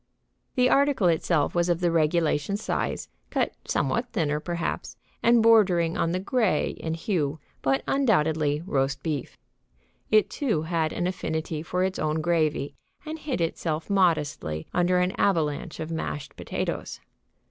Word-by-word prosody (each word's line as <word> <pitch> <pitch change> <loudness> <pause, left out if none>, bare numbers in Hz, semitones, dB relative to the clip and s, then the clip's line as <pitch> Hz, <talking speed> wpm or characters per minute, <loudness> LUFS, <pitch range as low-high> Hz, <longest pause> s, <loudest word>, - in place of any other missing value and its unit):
The 250 0 +4
article 275 -7 +3
itself 160 -2 +1
was 175 0 +1
of 170 -1 +2
the 175 -2 +1
regulation 165 +2 +1
size, 210 - -2 0.2
cut - - 0
somewhat 235 +1 0
thinner, 150 -7 0
perhaps, 170 +1 -4 0.2
and 235 -1 +5
bordering 185 -7 +4
on 165 - 0
the 180 - 0
gray 200 -4 +1
in 160 0 -4
hue, 160 -4 -1 0.2
but 135 +1 +1
undoubtedly 160 - +2
roast 135 -4 -1
beef. 150 -4 -3 0.7
It, 215 0 +5
too, 220 - -1
had 160 -1 0
an 175 - -2
affinity 160 -3 -2
for 180 +3 -1
its 190 0 -1
own 155 +1 0
gravy 155 -3 0 0.3
and 315 +1 -5
hid 275 - -3
itself 160 +1 -2
modestly 150 - +1
under 180 +1 +3
an 180 +1 +2
avalanche 160 -3 0
of 160 +1 -4
mashed 150 -3 -4
potatoes. - - -4
170 Hz, 145 wpm, -26 LUFS, 155-190 Hz, 0.7 s, and